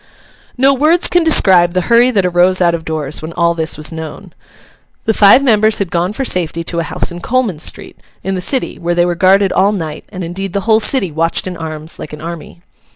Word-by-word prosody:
No 270 +2 +4
words 310 +6 +2
can 350 -1 +2
describe 185 - +3
the 185 - +2
hurry 235 +5 +3
that 200 -7 0
arose 180 +1 +2
out 175 -2 +2
of 165 -1 -4
doors 155 -2 -4
when 160 +2 -7
all 170 0 +1
this 160 -1 -2
was 155 +1 -1
known. 160 +3 -9 0.7
The 220 - +2
five 210 +6 +5
members 220 -4 +3
had 195 -4 -3
gone 175 +2 -1
for 265 +5 -4
safety 170 -5 -1
to 170 +1 -4
a - - -1
house - - -3
in 175 0 -8
Coleman 235 -9 -1
street, - - -5 0.2
in 195 - -2
the 185 - -3
City, 260 +7 -2
where 175 0 -2
they 175 0 +2
were 175 - 0
guarded 190 +2 +3
all 200 +2 +3
night; 160 -7 -5
and 185 - -7
indeed 185 +2 -5
the 200 - -1
whole 220 +1 +3
city 220 - +1
watched 165 +2 -1
in 185 -1 -5
arms 160 -1 -8
like 150 - -8
an 150 - -8
army. 170 +1 -9
180 Hz, 225 wpm, -14 LUFS, 165-210 Hz, 0.7 s, five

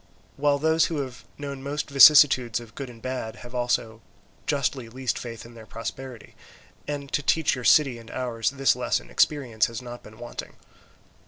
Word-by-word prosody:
While 145 0 +2
those 160 +2 +3
who 165 - -3
have 130 -3 -8
known 140 -2 -6
most 140 +1 -3
vicissitudes 135 -5 +7
of 115 -2 -13
good 135 0 -7
and 115 -2 -14
bad, 130 -4 -4
have 120 - -11
also 120 -2 -1 0.5
justly 130 -4 -1
least 130 +2 -3
faith 115 -1 -8
in 120 - -13
their 110 -2 -13
prosperity; 125 +1 -8 0.5
and 145 -1 -5
to - - +1
teach 160 +3 +2
your 125 - -5
city 135 -6 +4
and 115 0 -14
ours 120 -4 -2
this 135 -1 +2
lesson - - -2
experience 125 -8 +2
has 115 -2 -6
not 120 -1 -9
been 110 0 -15
wanting. 120 +1 -8
125 Hz, 175 wpm, -25 LUFS, 115-140 Hz, 0.5 s, vicissitudes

